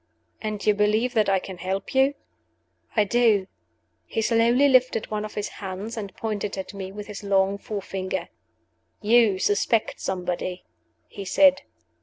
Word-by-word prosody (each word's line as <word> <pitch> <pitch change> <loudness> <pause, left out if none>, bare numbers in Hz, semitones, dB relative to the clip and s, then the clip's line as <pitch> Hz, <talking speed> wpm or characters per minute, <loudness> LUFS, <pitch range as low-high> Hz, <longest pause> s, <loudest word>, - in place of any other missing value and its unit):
"And 215 -2 -4
you 210 - +5
believe 215 +4 +1
that 215 -4 +2
I 195 - +4
can 185 -1 -7
help 190 +2 -3
you?" 270 +2 +3 0.8
"I 215 - +5
do." 215 -2 +3 0.6
He 225 - -1
slowly 235 +5 +4
lifted 255 -5 +2
one 210 0 -2
of 215 - -7
his 210 0 -2
hands, 195 +4 -6
and 205 -4 -6
pointed 210 -3 -3
at 190 +1 -6
me 190 -1 -6
with 205 +1 -7
his 205 -1 -8
long 195 0 +2
forefinger. 195 -2 -4 0.7
"You 220 -2 +4
suspect 205 +3 +1
somebody," 180 0 -3 0.4
he 200 - -8
said. 280 +8 +4
210 Hz, 150 wpm, -25 LUFS, 195-230 Hz, 0.8 s, you